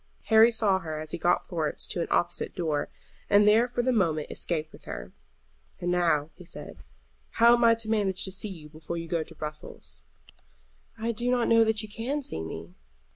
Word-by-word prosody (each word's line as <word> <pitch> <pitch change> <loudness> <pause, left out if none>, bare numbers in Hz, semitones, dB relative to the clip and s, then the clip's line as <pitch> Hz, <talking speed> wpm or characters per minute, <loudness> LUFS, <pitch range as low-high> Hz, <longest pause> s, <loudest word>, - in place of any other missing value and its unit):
Harry 220 +2 +8
saw 210 -4 +3
her 155 -4 -5
as 155 0 -6
he - - -2
got 175 +2 +2
Florence 160 -4 -1
to 175 - -2
an - - -2
opposite 175 - -1
door, 155 -4 -1 0.4
and 205 0 +5
there 225 +3 +5
for 240 0 -2
the 255 - +2
moment 165 -8 0
escaped 155 -2 -1
with - - -15
her. - - -7 0.7
"And 175 - -1
now," 165 -4 +1
he 180 - -14
said, 175 - -9 0.6
"how 235 +1 +6
am 240 0 +3
I 230 0 +6
to 225 -1 -2
manage 195 -3 0
to 190 - -4
see 195 +3 -1
you 165 -6 -10
before 155 +2 -6
you 165 0 -5
go 165 0 0
to - - -8
Brussels?" 150 - -6 1.0
"I 225 +1 -1
do 240 +2 -1
not 245 -1 +2
know 230 0 +6
that 220 -1 0
you - - -7
can 250 +8 -3
see 80 - -3
me." 80 +1 -7
185 Hz, 205 wpm, -27 LUFS, 155-225 Hz, 1.0 s, Harry